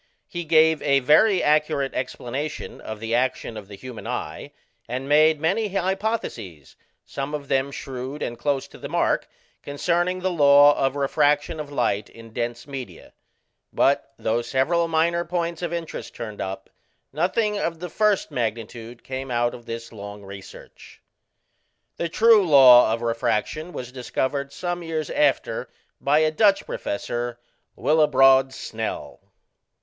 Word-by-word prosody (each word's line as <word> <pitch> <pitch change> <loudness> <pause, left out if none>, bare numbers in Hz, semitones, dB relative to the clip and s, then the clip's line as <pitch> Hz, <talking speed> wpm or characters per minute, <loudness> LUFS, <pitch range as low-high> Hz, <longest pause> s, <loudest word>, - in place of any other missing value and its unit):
He 175 -1 -5
gave 160 -1 +4
a 140 0 +3
very 175 - +4
accurate 150 -2 +1
explanation 130 +3 -5
of 110 -1 -7
the 115 +1 -4
action 125 -1 0
of 105 -3 -8
the 100 - -10
human 125 +2 -9
eye, - - -5 0.4
and 130 +3 -4
made 155 +1 +4
many 195 +8 +1
hypotheses, 190 - -3 0.3
some 140 +2 -4
of 140 -2 -7
them 135 +1 +1
shrewd 135 +1 -6
and 120 - -3
close 135 +1 -1
to - - -14
the - - -7
mark, - - 0 0.3
concerning 175 +5 -1
the 185 0 0
law 145 -2 +6
of 135 0 0
refraction 145 +3 +1
of 145 -1 -6
light 105 -7 -1
in 115 -1 -14
dense 120 0 -3
media: 135 -3 -9 0.6
but - - +1
though 115 +2 0
several 140 +8 +1
minor 165 +1 +1
points 170 -1 -3
of 175 -2 -3
interest 170 -2 -6
turned 110 -3 -6
up, 95 0 -6 0.4
nothing 205 +7 0
of 165 -3 -2
the 180 - -5
first 210 0 +1
magnitude 115 -1 -4
came 130 0 -5
out 120 0 0
of 120 - -12
this 115 0 -6
long 100 -1 -9
research. 100 0 -12 1.0
The 170 - -2
true 220 +3 +5
law 130 -6 +8
of 115 +1 -2
refraction 115 +8 -1
was 125 -6 -7
discovered 135 +2 -3
some 175 +3 -4
years 160 -2 -4
after 145 -2 0 0.3
by 145 +2 +2
a 155 0 +2
Dutch 200 +3 +3
professor, 120 +3 -4 0.4
Willebrod 135 -3 +4
Snell. 110 -3 -5
140 Hz, 145 wpm, -23 LUFS, 120-165 Hz, 1.0 s, law